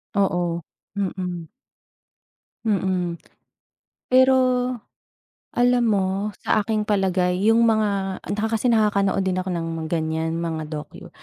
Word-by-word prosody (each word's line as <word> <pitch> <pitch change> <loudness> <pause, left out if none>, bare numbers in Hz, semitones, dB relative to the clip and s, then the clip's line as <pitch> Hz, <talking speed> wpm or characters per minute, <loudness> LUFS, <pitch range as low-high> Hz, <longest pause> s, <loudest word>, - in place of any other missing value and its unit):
Oo, 175 -4 +1 0.3
mm. 180 -4 -3 1.2
Mm, 185 -5 0 0.9
pero 260 +1 +5 1.2
alam 245 0 +4
mo? 195 -3 +2 0.4
Sa - - +2
aking 215 0 -1
palagay 185 -3 +1
yung 230 +1 +5
mga 200 -4 +1
ah, - - -12
naka 220 +1 -1
kasi 250 - 0
nakakanood 205 -4 +2
din 185 -1 0
ako 185 0 -3
ng 165 -1 -3
ganyan 160 0 -1
mga 160 -2 -3
dokyu. 150 -1 -8
190 Hz, 110 wpm, -23 LUFS, 170-215 Hz, 1.2 s, pero